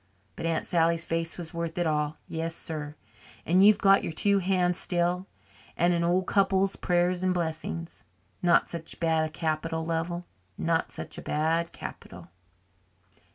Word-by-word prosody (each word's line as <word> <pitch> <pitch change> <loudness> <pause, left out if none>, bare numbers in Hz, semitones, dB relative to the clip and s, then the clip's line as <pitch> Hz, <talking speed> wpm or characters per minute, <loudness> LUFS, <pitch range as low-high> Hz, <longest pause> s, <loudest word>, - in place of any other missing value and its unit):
But 165 - -3
Aunt 165 -1 0
Sally's 165 -1 +2
face 165 0 -2
was 170 -2 -7
worth 170 0 -4
it 175 - +1
all 150 -1 0
yes, 165 0 -3
sir. 150 -3 -5 0.5
And 185 +3 +4
you've 210 0 +7
got 195 0 +5
your - - -2
two 200 +5 +2
hands 180 -1 +1
still 175 +1 0 0.5
and 175 +1 +3
an 170 0 +1
old 180 +2 +2
couple's 195 0 +2
prayers 175 0 +1
and 185 -1 +1
blessings. 165 0 -4 0.4
Not 175 -1 +4
such 165 -2 -6
a - - -24
bad 160 -2 +1
capital, 160 0 -2
Lovell, 170 +2 -2 0.3
not 165 0 0
such - - -6
a - - -7
bad 165 +2 0
capital." 85 -1 -9
170 Hz, 155 wpm, -28 LUFS, 160-180 Hz, 0.5 s, you've